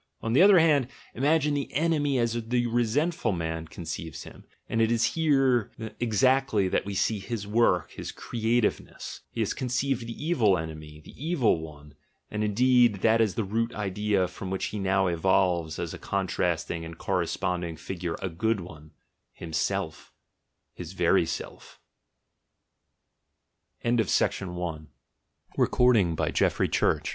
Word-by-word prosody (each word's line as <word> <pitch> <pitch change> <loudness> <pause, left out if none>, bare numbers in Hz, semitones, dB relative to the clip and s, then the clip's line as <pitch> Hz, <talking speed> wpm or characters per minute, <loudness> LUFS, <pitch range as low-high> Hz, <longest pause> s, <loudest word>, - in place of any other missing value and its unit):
On 115 - -2
the 140 - +5
other 195 0 +8
hand, 150 -6 +4 0.3
imagine 150 +3 +2
the 140 -2 -2
"enemy" 145 -1 +1
as 115 -2 +1
the 120 0 +1
resentful 120 +7 0
man 80 -2 -3
conceives 80 -2 -7
him - - -13
— - - -46
and 115 - 0
it 115 0 +3
is 115 -1 +2
here 135 -8 +2 0.3
exactly 120 -2 +2
that 95 - -1
we 100 - -4
see 105 +2 +1
his 105 +1 -5
work, 105 -5 +2
his - - -7
creativeness; 115 -1 -2
he - - -4
has - - 0
conceived 125 -1 -1
"the 115 +6 -7
evil 115 - +3
enemy," 75 -1 -7
the - - -11
"evil 140 - +2
one," 75 -2 -11 0.4
and 105 0 -2
indeed 120 -1 +3
that 115 0 +4
is 105 -6 +1
the 110 - 0
root 115 +4 -2
idea 100 -1 0
from 95 - -8
which 95 0 -2
he 105 - -3
now 95 0 +2
evolves 85 -2 +1
as - - -4
a - - -8
contrasting 85 -3 -1
and 80 0 -9
cor 95 +1 -1
responding 85 -1 -2
figure 85 +1 -5
a 95 - -1
"good 105 +6 0
one," 80 -3 -11 0.4
himself 80 -1 -3 0.3
— - - -53
his - - -8
very - - +3
105 Hz, 135 wpm, -27 LUFS, 90-125 Hz, 0.4 s, other